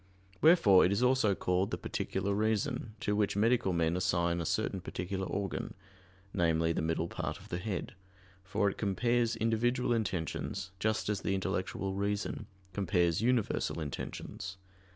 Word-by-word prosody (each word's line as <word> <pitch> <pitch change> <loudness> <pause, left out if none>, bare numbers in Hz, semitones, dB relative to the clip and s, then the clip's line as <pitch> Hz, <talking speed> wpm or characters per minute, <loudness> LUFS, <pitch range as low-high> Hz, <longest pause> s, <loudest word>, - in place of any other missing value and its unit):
Wherefore 155 - +7
it 90 - +3
is 100 +5 +1
also 125 -6 +3
called 90 +2 0
the - - -2
"particular 100 - -2
reason," 110 +2 0
to 105 - 0
which 105 -2 +1
medical 115 -1 +3
men 85 -1 +1
assign 85 -1 +1
a 80 - -2
certain 95 - -1
particular 95 +2 -4
organ, 100 -2 -3 0.6
namely, 80 -2 +2
the - - -1
middle 80 +1 0
part - - -4
of - - -15
the 85 - -2
head: 95 -1 -4 0.5
for 100 +2 0
it 100 - -2
compares 115 +3 +1
individual 115 +2 +1
intentions, 95 -3 -2
just 110 +2 0
as 105 -1 -1
the 95 - 0
intellectual 95 0 -2
reason 100 +1 -2 0.3
compares 90 -3 +1
universal 115 -7 +1
intentions. 95 +6 -5
100 Hz, 150 wpm, -32 LUFS, 90-110 Hz, 0.6 s, Wherefore